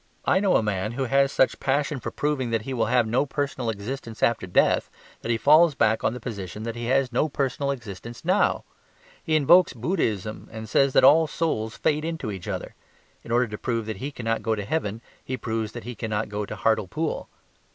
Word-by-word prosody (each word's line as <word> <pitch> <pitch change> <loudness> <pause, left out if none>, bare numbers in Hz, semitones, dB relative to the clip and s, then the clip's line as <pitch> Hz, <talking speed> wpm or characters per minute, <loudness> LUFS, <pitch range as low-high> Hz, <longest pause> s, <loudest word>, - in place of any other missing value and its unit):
I 185 - +3
know 195 -2 +2
a - - +3
man 105 +1 -2
who 135 +2 -2
has 135 +2 +3
such 130 - +3
a - - -14
passion 140 +1 0
for - - -4
proving 145 -4 -1
that 115 -2 -1
he 135 - -4
will 115 -4 0
have 120 0 +3
no 120 +6 +1
personal 135 -4 -2
existence 115 +2 -5
after 115 -5 +2
death 90 - +2 0.3
that - - -6
he 115 - +2
falls 155 +4 +5
back 110 -4 +2
on - - +2
the - - -6
position 105 -3 -6
that 115 0 -4
he 120 0 -5
has 130 +1 +2
no 140 +6 +1
personal 140 0 -1
existence 120 - -6
now. 185 +4 +2 0.6
He 160 -3 0
invokes 175 +5 +5
Buddhism 110 - -2
and 110 0 -7
says 135 +5 +3
that - - +5
all 155 +4 +7
souls 115 -10 -2
fade 150 0 +1
into 160 -9 -3
each 95 -4 -7
other; - - -4 0.5
in - - -12
order 120 +1 +3
to 105 - -6
prove 115 -3 -2
that 110 -2 -5
he 135 +8 -4
cannot 115 -5 -2
go 110 -1 0
to 105 -2 -5
heaven 115 -6 -2 0.2
he 130 - -4
proves 110 -3 -3
that 120 - -7
he 125 - -6
cannot 110 -1 -3
go 105 0 -3
to - - -5
Hartlepool. 110 - -1
120 Hz, 215 wpm, -25 LUFS, 110-140 Hz, 0.6 s, all